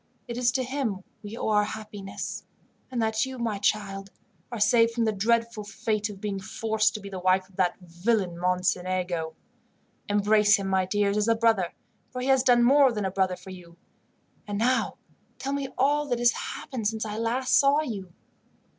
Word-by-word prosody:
It 235 - -5
is 245 0 +2
to 260 0 0
him 250 -7 -3 0.2
we 210 +2 -8
owe - - -2
our 210 -1 +4
happiness, 210 -2 -6 0.5
and 250 -2 -3
that 220 0 +1
you, 265 -1 -5
my 225 -4 -2
child, 200 -1 -1 0.4
are 235 - -4
saved 230 +2 +4
from 235 -1 +1
the 220 - +2
dreadful 230 +1 0
fate 215 +1 -2
of 200 -2 -9
being 200 -1 -3
forced 220 +2 0
to - - -3
be 200 - -9
the 190 -2 -6
wife 185 +1 +2
of 195 - -23
that 185 -2 +1
villain 180 +2 -1
Mocenigo. 180 -2 -1 0.7
"Embrace 205 0 +4
him, 195 -1 -3
my 190 -1 +1
dears, 205 +1 +1
as 210 +1 +1
a 230 - +4
brother, 225 -6 +2 0.4
for 250 - -6
he 255 +2 -2
has 265 -1 +5
done 245 -2 +4
more 270 +1 +6
than 210 -3 -2
a 190 - -1
brother 190 -1 +1
for 180 +1 -12
you. 175 -2 -12 0.7
And 205 -1 -3
now 250 +4 +1 0.4
tell 275 +1 -3
me 280 -1 -2
all 290 +3 +2
that 245 -3 0
has 240 0 +4
happened 240 -7 -4
since 220 +1 -2
I 215 0 -4
last 245 +3 0
saw 285 +2 +4
you." 200 - -6
215 Hz, 190 wpm, -27 LUFS, 195-235 Hz, 0.7 s, more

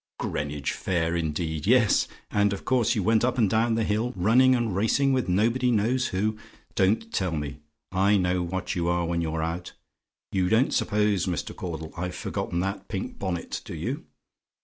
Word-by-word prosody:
"Greenwich 75 -1 -3
Fair, 85 -2 -1
indeed! 80 0 -2
Yes, 120 -2 +4 0.2
and 100 -1 +2
of 100 - -7
course 125 -4 +2
you 105 - 0
went 110 +2 +3
up 125 +1 +1
and 115 -4 +4
down 115 +3 +2
the 115 - +1
hill, 110 +3 0
running 120 +8 +5
and 115 -6 -1
racing 135 +7 +2
with 130 -7 0
nobody 115 +7 +2
knows 120 +3 +2
who. 105 +3 -1 0.3
Don't 110 +4 +1
tell 95 -3 0
me; 75 -2 -4 0.3
I 100 +2 +3
know 90 -1 +1
what 90 +2 -3
you 85 -1 -1
are 85 0 +1
when 85 0 -1
you're 80 -1 -2
out. 85 +2 -4 0.6
You 90 -2 +1
don't 115 +5 +3
suppose, 105 -3 +1
Mr. 90 - -3
Caudle, 80 -3 -6
I've 90 +1 -4
forgotten 85 - -3
that 95 +2 -3
pink 95 -2 -5
bonnet, 95 -4 -3
do - - -7
you? - - -4
95 Hz, 180 wpm, -26 LUFS, 85-110 Hz, 0.6 s, running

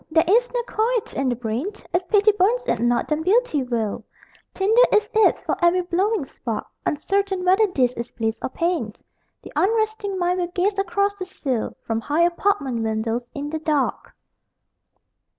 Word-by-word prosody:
There 320 0 +4
is 475 +6 +3
no 485 -1 -1
quiet 460 0 -1
in 270 -1 0
the 245 - 0
brain 235 - -3 0.3
If 355 +1 0
pity 420 0 +5
burns 425 +6 +1
it 365 - 0
not, 240 +1 +1
then 305 0 -1
beauty 385 - +2
will: 235 -5 -2 0.5
Tinder 430 +5 +3
it - - +4 0.2
is 440 - +5
for - - 0
every 350 +1 +4
blowing 370 +1 0
spark. 230 -4 -5 0.2
Uncertain 385 +4 -1
whether 385 +4 +4
this 255 -9 +1
is 235 0 -6
bliss 225 -1 -3
or - - -2
pain 330 -10 -2 0.5
The - - -11
unresting 435 -1 0
mind 360 0 0
will 350 - 0
gaze 385 +3 -1
across 400 +1 +1
the 370 - -3
sill 270 -10 -3
From 225 0 -1
high 300 +7 +1
apartment 340 - 0
windows, 225 +1 -1
in 290 +1 -4
the 315 - -2
dark. 300 -3 -1
350 Hz, 170 wpm, -22 LUFS, 255-405 Hz, 0.5 s, pity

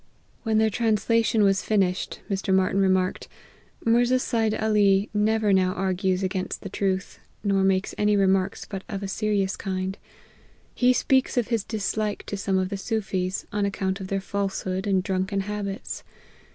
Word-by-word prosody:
When 220 -2 +1
their 220 0 +3
translation 225 0 +2
was 195 -1 +3
finished, 195 -3 0
Mr. 195 -1 -2
Martyn 190 +1 +3
remarked, 185 -1 +1 0.3
" - - -26
Mirza 240 +2 +4
Seid 225 -3 0
Ali 205 -2 +2
never 215 0 +2
now 185 -1 +3
argues 190 0 0
against 185 0 -2
the 195 - -5
truth, 190 -1 -2 0.2
nor 195 -2 +2
makes 190 0 +1
any 210 0 +3
remarks 195 0 +1
but 195 -1 -6
of 200 -1 -4
a - - -2
serious 200 -1 0
kind. 190 0 -3 0.7
He 250 0 +4
speaks 260 +1 +2
of 240 -2 +1
his 230 -4 0
dislike 215 -1 -2
to - - -4
some 195 -1 0
of 185 0 0
the 200 - -3
Soofies, 195 -3 -2
on 205 0 0
account 195 -1 -1
of 190 - -5
their 195 +1 -1
falsehood 195 -1 -2
and 190 -2 +2
drunken 190 +1 -1
habits. 200 0 -5
195 Hz, 165 wpm, -25 LUFS, 190-215 Hz, 0.7 s, Mirza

